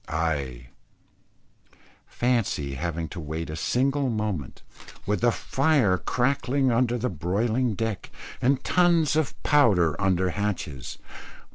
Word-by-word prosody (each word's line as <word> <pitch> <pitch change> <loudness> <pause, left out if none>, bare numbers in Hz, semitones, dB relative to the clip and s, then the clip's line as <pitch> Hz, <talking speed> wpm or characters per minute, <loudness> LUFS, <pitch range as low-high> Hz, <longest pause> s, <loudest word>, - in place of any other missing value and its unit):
_ - - -10
Aye; 70 -6 -2 1.4
fancy 115 - 0
having 80 +3 -3
to 90 - -7
wait 80 +1 -5
for - - -4
a - - -4
single 135 - +1
moment, 105 - -3 0.4
with 105 +2 -1
the 120 0 +4
fire 130 - +2
crackling 130 +1 +1
under 120 +1 +2
the 125 +2 -1
broiling 110 - 0
deck, 110 -2 -3 0.3
and 130 +2 +2
tons 170 -4 +3
of 155 -3 0
powder 100 - +4
under 95 -1 +2
hatches. 95 -11 -4
105 Hz, 125 wpm, -26 LUFS, 85-125 Hz, 1.4 s, the